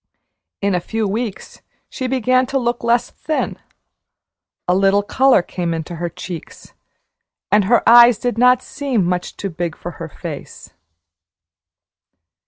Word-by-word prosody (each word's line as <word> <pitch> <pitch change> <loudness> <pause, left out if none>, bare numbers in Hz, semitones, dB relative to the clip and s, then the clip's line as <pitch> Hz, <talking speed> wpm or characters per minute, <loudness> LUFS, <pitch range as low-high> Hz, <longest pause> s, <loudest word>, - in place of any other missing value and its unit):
In 200 -1 +2
a 180 - +1
few 220 +4 -2
weeks 215 0 -5 0.3
she 260 - -4
began 255 0 +2
to 270 +1 -1
look 240 -2 -1
less 235 +1 +1
thin. 310 - -3 1.1
A 180 - +3
little 195 +2 +3
color 255 -1 +3
came 170 -2 -3
into 165 +1 -6
her 175 +1 -3
cheeks, 170 -1 -9 0.8
and 205 -1 +4
her 235 +4 +2
eyes 240 -1 +8
did 245 0 -2
not 250 +2 +4
seem 270 -9 -1
much 180 0 -3
too 195 - -4
big 170 0 -4
for 175 - -7
her 165 - -5
face. - - -9
210 Hz, 140 wpm, -19 LUFS, 180-245 Hz, 1.1 s, eyes